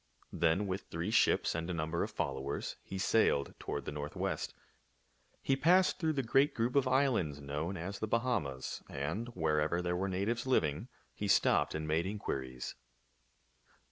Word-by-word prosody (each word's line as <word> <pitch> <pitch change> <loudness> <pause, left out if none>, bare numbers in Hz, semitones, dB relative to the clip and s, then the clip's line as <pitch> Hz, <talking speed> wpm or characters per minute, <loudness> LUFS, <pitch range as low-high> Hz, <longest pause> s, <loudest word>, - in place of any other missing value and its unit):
Then 85 +4 +2
with 95 0 -3
three 85 +6 -2
ships 110 - +3
and 85 +2 -3
a 90 - -1
number 80 +1 -1
of 105 - -1
followers 70 -8 -3
he 95 - -7
sailed 95 -8 +2
toward - - -4
the - - -3
northwest. 75 0 -3 0.9
He 135 - +3
passed 180 +7 +4
through 160 -2 +1
the 135 -2 0
great 135 +5 +3
group 120 +3 0
of 140 -2 +4
islands 125 - +2
known 75 +6 -3
as 95 +4 -5
the 110 - -2
Bahamas; 105 - -1
and, 80 - -3
wherever 80 0 +1
there 90 0 -1
were 95 +2 -1
natives 110 +7 -1
living, 80 - +1 0.3
he 105 - -3
stopped 95 - +3
and 80 0 -3
made 80 +3 +1
inquiries. 65 -11 -4
90 Hz, 160 wpm, -33 LUFS, 75-115 Hz, 0.9 s, passed